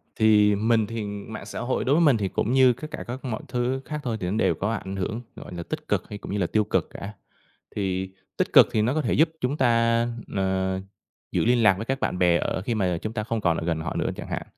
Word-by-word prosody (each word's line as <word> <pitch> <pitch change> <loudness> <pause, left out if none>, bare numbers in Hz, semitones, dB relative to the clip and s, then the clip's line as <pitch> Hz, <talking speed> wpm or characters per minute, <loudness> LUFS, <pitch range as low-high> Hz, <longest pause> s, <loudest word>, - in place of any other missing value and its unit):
Thì 105 -2 +5
mình 110 0 +2
thì 115 -1 -4
mạng 100 +2 -7
xã - - -6
hội 130 +1 -1
đối 140 +3 +3
với 170 - +4
mình 140 -7 +5
thì 100 -2 -1
cũng 110 - -1
như 130 -2 +6
các 155 +6 -9
cả - - -5
các 130 +3 -6
mọi 120 +3 -3
thứ 125 +1 -1
khác 150 -1 -4
thôi 115 -3 -2
thì 90 - -3
nó 105 - -1
đều - - +2
có 105 +3 -1
ảnh 95 -3 -4
hưởng, 110 +5 -3
gọi - - -10
nà, 85 -1 -5
tích - - -6
cực - - -1
hay 105 - -6
cũng - - -8
như 105 - -1
là 90 -4 +1
tiêu 110 -1 +2
cực 95 -5 0
cả. 100 +2 -7 0.6
Thì 95 -2 -1 0.3
tích - - 0
cực - - +9
thì 110 - +2
nó 120 +5 +1
có 155 - +1
thể 120 - 0
giúp 160 +3 +4
chúng 130 +4 0
ta, 115 -2 +3 0.3
ờ, 95 0 0 0.5
giữ - - +1
liên 120 -1 +3
lạc 100 -2 +7
với 110 - -4
các 135 +1 -2
bạn - - -1
bè 90 -1 +4
ở 95 - -2
khi 115 +3 -2
mà 90 -4 0
chúng 110 +1 -4
ta 105 -2 -2
không 115 -1 -2
còn 85 -3 +2
ở 80 - -3
gần 80 -2 0
họ - - -4
nữa - - 0
chẳng - - -7
hạn, - - -3
110 Hz, 275 wpm, -25 LUFS, 95-120 Hz, 0.6 s, cực